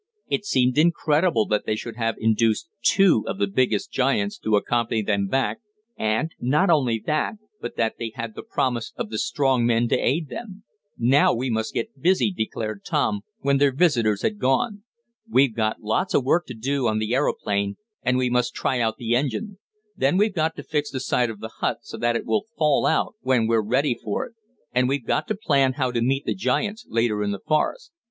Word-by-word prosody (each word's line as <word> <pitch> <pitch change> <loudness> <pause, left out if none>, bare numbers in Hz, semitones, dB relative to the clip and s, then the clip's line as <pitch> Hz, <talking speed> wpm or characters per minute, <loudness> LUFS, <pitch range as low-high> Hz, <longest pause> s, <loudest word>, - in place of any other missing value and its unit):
It 205 - -1
seemed 130 -5 +2
incredible 160 - +3
that 105 -1 0
they 110 - +1
should 115 +1 -6
have 115 -1 -1
induced 110 +4 +1
two 190 - +4
of - - -3
the 100 - +2
biggest 105 +1 0
giants 125 -6 0
to 110 - +1
accompany 115 +1 0
them 100 -1 0
back, 135 +6 0 0.4
and, 110 +9 0
not 150 +9 +2
only 130 -8 +2
that, 155 +7 0 0.3
but 120 - -6
that 110 -1 0
they 115 -1 -4
had 115 -1 -5
the - - -7
promise 120 -3 -2
of 105 - -5
the 110 - -2
strong 135 -4 +1
men 120 0 +2
to - - +3
aid 150 +5 0
them. 205 - -8 0.3
"Now 130 +4 +4
we 125 +2 -2
must 110 0 -2
get 225 +1 -4
busy," 185 +4 +3
declared 110 - -4
Tom, 105 -2 0 0.2
when 140 0 +2
their 140 -1 +4
visitors 120 - +2
had 215 -1 -1
gone. 135 +11 +1 0.5
"We've 135 - +4
got 110 -1 -1
lots 110 - 0
of 130 - +2
work 170 +6 +2
to 125 - -7
do 130 +3 -1
on 110 -1 +1
the 110 +2 -1
aeroplane, 100 -7 0 0.3
and 125 0 +1
we 130 0 +1
must 125 0 +1
try 130 - 0
out 110 -2 0
the 120 0 0
engine. 190 - -2 0.4
Then 140 +1 +2
we've 210 +1 +2
got 160 -2 0
to - - -8
fix 150 -2 -1
the 130 - -4
side 125 -2 +1
of 110 -2 -8
the 110 - -5
hut - - -1
so - - -9
it 120 0 0
will 215 0 0
fall 150 -3 +3
out 160 - +1
when 130 -3 +2
we're 115 0 +2
ready 125 +6 +1
for 105 - -2
it. - - -14 0.4
And 125 +1 +2
we've 135 -3 -1
got - - 0
to 215 - -1
plan 140 -10 +2
how 130 -2 -1
to 120 -1 -1
meet 135 +3 0
the - - 0
giants 210 +4 -1
later 115 -2 +1
in 105 - 0
the 100 -1 -3
forest." 160 - 0
125 Hz, 205 wpm, -24 LUFS, 110-150 Hz, 0.5 s, two